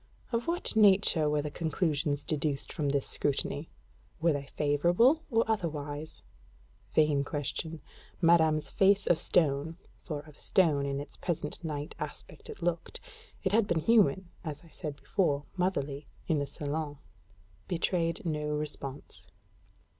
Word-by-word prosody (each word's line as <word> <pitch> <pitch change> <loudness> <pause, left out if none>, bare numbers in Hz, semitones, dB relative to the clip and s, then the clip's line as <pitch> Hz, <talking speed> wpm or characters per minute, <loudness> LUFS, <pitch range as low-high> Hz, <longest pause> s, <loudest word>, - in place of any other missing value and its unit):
Of 235 0 -1
what 345 -6 +1
nature 195 -7 +5
were 150 -1 +1
the 150 - -4
conclusions 150 -3 0
deduced 145 -2 -1
from 145 -2 -1
this 140 -1 +1
scrutiny? 145 +2 -1 0.5
Were 165 0 +3
they 140 -1 -4
favorable 175 - +4
or 230 -3 +3
otherwise? 155 -8 -3 0.7
Vain 150 -2 +4
question. 155 +2 -4 0.4
Madame's 160 -3 +4
face 200 +1 +4
of 170 - +3
stone 155 0 +1 0.2
(for 150 -4 -5
of 150 -1 -15
stone 150 -7 +3
in 140 0 -2
its 145 - -9
present 165 -2 -3
night 150 -2 -4
aspect - - -7
it - - -8
looked: 170 -1 -2 0.4
it 190 - +1
had 215 0 +3
been 170 -3 +1
human, 190 -2 +3
and 165 - -3
as 150 +1 -7
I 165 - -17
said 150 -1 -6
before, 145 -5 0
motherly, 145 -6 -1 0.2
in 160 -4 +2
the 140 - -2
salon) 145 0 -4 0.7
betrayed 170 -1 0
no 150 -2 -1
response. 150 -2 -5
155 Hz, 140 wpm, -30 LUFS, 145-175 Hz, 0.7 s, nature